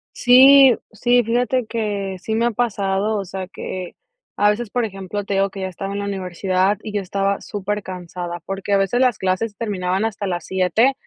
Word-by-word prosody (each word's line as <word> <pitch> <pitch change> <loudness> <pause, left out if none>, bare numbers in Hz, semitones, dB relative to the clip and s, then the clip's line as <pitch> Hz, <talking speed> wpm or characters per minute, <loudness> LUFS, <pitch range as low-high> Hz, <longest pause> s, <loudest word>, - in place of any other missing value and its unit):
Sí, 265 +1 +7 0.2
sí, 245 +3 +2
fíjate 245 +2 0
que 205 -4 -3
sí 220 +4 -3
me 230 +1 +1
ha - - 0
pasado, 205 -2 0
o 200 - -3
sea, 190 +1 -6
que 185 -1 -7 0.4
a 205 0 +3
veces, 225 +1 -1
por 245 +3 -1
ejemplo, 195 0 -5
te 200 0 -3
digo 195 0 +2
que 195 - -8
ya 190 - -2
estaba 195 +2 -6
en 200 - -3
la 200 - -3
universidad 190 0 0
y 215 - -6
yo 205 - 0
estaba 195 +1 -1
supercansada, 185 -4 -5
porque, 195 +1 -3
a - - +5
veces 195 +5 +1
las 250 -5 +3
clases 190 +3 -1
terminaban 190 -2 -1
hasta 210 -2 -3
las 175 -3 -3
7 190 +8 +2
200 Hz, 195 wpm, -20 LUFS, 190-225 Hz, 0.4 s, Sí